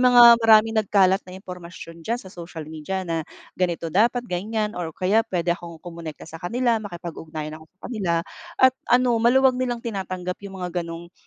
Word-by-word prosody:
mga 240 -2 +8
maraming 225 0 +6
nagkalat 195 -1 +3
na 180 - -8
impormasyon 180 -3 -10
diyan 230 +8 -1
sa 190 -5 -11
social 170 -2 -8
media 160 +5 -4
na, 165 -2 -1 0.3
ganito 170 -3 -2
dapat 235 +5 +3
ganyan 210 +2 -2
or 175 -5 -4
kaya 200 +5 +3
pwede 175 -1 +1
akong 170 -1 -8
kumonekta 165 -1 -9
sa 165 0 -10
kanila 235 +4 +1
makipag-ugnayan 165 -5 -7
ako - - -14
sa 185 - -52
kanila, 205 -8 -2 0.4
at 260 0 +6 0.2
ano 250 0 +4
maluwag 260 +2 +5
nilang 240 -2 -2
tinatanggap 185 -4 -4
yung 200 -1 -9
mga 180 0 -2
gano'ng, 170 +1 -8
185 Hz, 170 wpm, -24 LUFS, 170-225 Hz, 0.4 s, mga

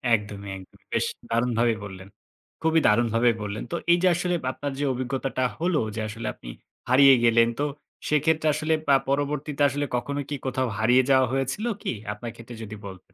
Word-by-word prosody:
একদমই, 100 -2 -6
একদমই। 95 - -16
বেশ - - +2 0.2
দারুণভাবেই 115 -1 +1
বললেন। 95 -1 -9 0.5
খুবই 160 0 +3
দারুণভাবে 115 +2 +3
বললেন। 105 0 -4
তো - - -1 0.2
এই 175 - +6
যে - - +5
আসলে 180 +1 0 0.2
আপনার 145 +2 -5
যে 145 - 0
অভিজ্ঞতাটা 130 +1 -2 0.2
হলো 170 -1 +1 0.2
যে 110 - -2
আসলে 115 +1 -6
আপনি - - -12 0.4
হারিয়ে 135 +1 +7
গেলেন 115 0 +5
তো 145 - +1 0.4
সেক্ষেত্রে 155 +1 +2
আসলে 155 +2 0
পা 140 - +6
পরবর্তীতে 145 +1 -1
আসলে 145 +2 -2
কখনো 140 +4 -2
কি 145 - -2
কোথাও 130 -1 0
হারিয়ে 125 +4 +4
যাওয়া 130 -1 +5
হয়েছিল 135 - -1 0.2
কি - - -2 0.2
আপনার 115 +3 -7
ক্ষেত্রে 115 0 -10
যদি 110 0 -7
বলতেন? 95 0 -12
130 Hz, 175 wpm, -25 LUFS, 115-145 Hz, 0.5 s, হারিয়ে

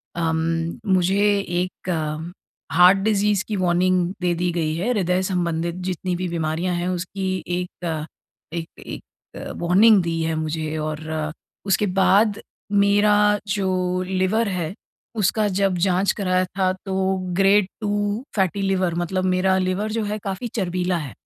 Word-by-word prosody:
अम, 165 -1 0 0.6
मुझे 185 +2 +2 0.2
एक 180 0 -3 0.8
heart 180 +4 +7
disease 210 -1 +2
की 215 - -2
वॉर्निंग 180 0 +2 0.2
दे 175 -1 +1
दी 175 +1 0
गई 160 -2 -1
है। 190 +9 -1
हृदय 185 -4 +1
संबंधित 170 -2 -1
जितनी 180 0 -2
भी 180 +1 -3
बीमारियाँ 170 +2 -1
हैं 175 +1 -2
उसकी 185 +1 -3
एक, 175 -2 -3 0.5
एक 165 -1 -3 0.2
एक - - -7 0.5
वॉर्निंग 195 +4 +5
दी 165 -1 -1
है 160 0 -1
मुझे 155 0 -3
और 155 0 -3 0.6
उसके 195 +2 +2 0.2
बाद 205 +1 +3 0.3
मेरा 205 +1 +4 0.3
जो 185 -2 0
लिवर 190 +4 +1
है 180 -2 -3 0.4
उसका 210 +1 +2
जब 195 -1 +1
जाँच 185 +1 +2
कराया 185 -2 +1
था 185 0 0
तो 190 0 0 0.2
ग्रेड 195 0 +4 0.2
2 205 +3 -1
फैटी 195 0 +1
लिवर 190 -3 +1
मतलब 185 +2 -1
मेरा 190 +1 +2
लिवर 190 +3 -1
जो 225 -1 -1
है 210 +1 -2
काफ़ी 195 +5 -3
चर्बीला 180 -2 0
है। 145 -6 -6
185 Hz, 140 wpm, -22 LUFS, 175-195 Hz, 0.8 s, heart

